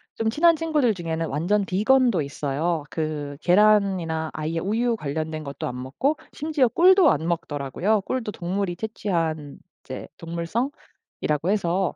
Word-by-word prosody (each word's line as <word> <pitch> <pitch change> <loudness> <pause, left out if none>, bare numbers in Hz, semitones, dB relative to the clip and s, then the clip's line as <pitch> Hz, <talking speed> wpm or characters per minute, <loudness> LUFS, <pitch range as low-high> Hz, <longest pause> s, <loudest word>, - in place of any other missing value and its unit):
좀 225 0 0
친한 335 +8 +4
친구들 305 -7 +1
중에는 165 -3 -3
완전 180 +9 0
비건도 220 +1 +3
있어요. 145 +3 -2
그 150 -3 -3
계란이나 185 -5 +3
아예 155 +2 -2
우유 225 +6 0
관련된 155 -2 -4
것도 140 -1 -5
안 125 0 -5
먹고 230 - 0 0.2
심지어 300 -4 +1
꿀도 365 - +6
안 160 +2 -1
먹더라고요. 170 - 0
꿀도 225 +1 -3
동물이 180 0 -3
채취한 165 -9 -2 0.3
이제 - - -7
동물성이라고 170 +11 -2 0.8
해서 190 -2 0
175 Hz, 315 characters per minute, -24 LUFS, 160-220 Hz, 0.8 s, 꿀도